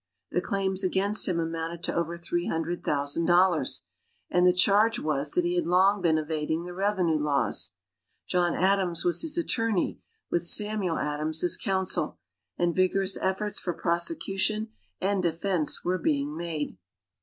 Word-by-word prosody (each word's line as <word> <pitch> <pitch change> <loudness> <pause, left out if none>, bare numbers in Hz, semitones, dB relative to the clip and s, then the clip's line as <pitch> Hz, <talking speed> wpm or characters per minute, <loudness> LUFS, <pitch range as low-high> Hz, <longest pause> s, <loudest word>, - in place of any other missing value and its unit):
The 180 - +1
claims 195 0 -1
against 195 +3 +2
him 175 -3 0
amounted 165 +1 -4
to - - -1
over 170 0 -1
three 175 0 -2
hundred 165 +2 -2
thousand 145 +3 0
dollars, 175 -4 +3 0.5
and 180 0 +4
the - - +7
charge 205 +5 +3
was 150 - -1
that 180 - +2
he 175 - 0
had 175 -1 0
long 190 +3 +4
been 165 -3 +3
evading 155 +1 -2
the 180 0 -7
revenue 185 -4 +1
laws. 145 -8 0 0.5
John 175 -1 +1
Adams 185 -2 +1
was 175 -1 +3
his 325 +1 -1
attorney, 225 - 0 0.3
with 175 - +1
Samuel 205 -1 +2
Adams 150 +2 -2
as 175 - +2
counsel, 190 - -1 0.4
and 175 -1 +1
vigorous 190 +1 +2
efforts 195 +2 -1
for 175 - -3
prosecution 195 - -1 0.3
and 195 0 0
defense 170 -1 0
were 180 +1 0
being 145 -1 0
made. 160 - -4
175 Hz, 155 wpm, -27 LUFS, 165-195 Hz, 0.5 s, the